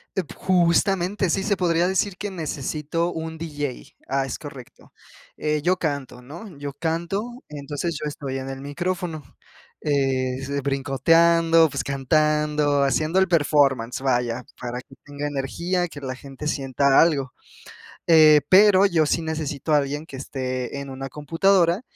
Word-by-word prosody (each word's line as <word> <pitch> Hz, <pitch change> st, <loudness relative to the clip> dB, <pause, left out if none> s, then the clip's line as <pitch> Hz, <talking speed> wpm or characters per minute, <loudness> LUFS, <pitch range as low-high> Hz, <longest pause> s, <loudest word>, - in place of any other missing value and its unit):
De 190 Hz, -, 0 dB
p 155 Hz, -, -14 dB
justamente 185 Hz, +2 st, +1 dB
sí 195 Hz, +3 st, 0 dB
se 205 Hz, 0 st, +1 dB
podría 170 Hz, -1 st, +2 dB
decir 190 Hz, 0 st, 0 dB
que 205 Hz, +2 st, -5 dB
necesito 160 Hz, 0 st, -3 dB
un 160 Hz, 0 st, -5 dB
DJ. 145 Hz, -5 st, -6 dB
Ah, 135 Hz, +1 st, 0 dB
es 135 Hz, -, -5 dB
correcto. 140 Hz, -5 st, -12 dB, 0.5 s
Eh, 150 Hz, -1 st, -1 dB
yo 180 Hz, +4 st, +2 dB
canto, 140 Hz, -6 st, -4 dB
¿no? 165 Hz, -, -10 dB
Yo 140 Hz, 0 st, -6 dB
canto, 185 Hz, -, -3 dB
entonces 150 Hz, +3 st, -4 dB
yo 150 Hz, -, -2 dB
estoy 135 Hz, -2 st, -5 dB
en 135 Hz, 0 st, -6 dB
el 135 Hz, 0 st, -7 dB
micrófono, 170 Hz, +2 st, -3 dB, 0.6 s
eh, 135 Hz, -3 st, 0 dB, 0.3 s
brincoteando, 165 Hz, +4 st, +3 dB
pues -, -, -3 dB
cantando, 150 Hz, +1 st, +1 dB
haciendo 155 Hz, +6 st, +1 dB
el 190 Hz, -, +3 dB
performance, 140 Hz, -7 st, +2 dB
vaya, 125 Hz, -2 st, 0 dB, 0.2 s
para 125 Hz, 0 st, -5 dB
que 135 Hz, -, -18 dB
tenga 145 Hz, 0 st, -5 dB
energía, 170 Hz, +6 st, -2 dB
que 145 Hz, -4 st, -11 dB
la 130 Hz, -1 st, -4 dB
gente 135 Hz, +3 st, -8 dB
sienta 135 Hz, -1 st, +2 dB
algo. 140 Hz, -6 st, +2 dB, 0.7 s
Eh, 155 Hz, -2 st, +7 dB
pero 195 Hz, 0 st, +6 dB
yo 165 Hz, -6 st, +2 dB
sí 165 Hz, -, 0 dB
necesito 155 Hz, -2 st, -3 dB
a 150 Hz, -, +6 dB
alguien 145 Hz, +2 st, -2 dB
que 135 Hz, -, -10 dB
esté 130 Hz, -1 st, -4 dB
en 140 Hz, -1 st, -8 dB
una 135 Hz, +1 st, -6 dB
computadora. 170 Hz, -, +2 dB
150 Hz, 150 wpm, -23 LUFS, 135-170 Hz, 0.7 s, Eh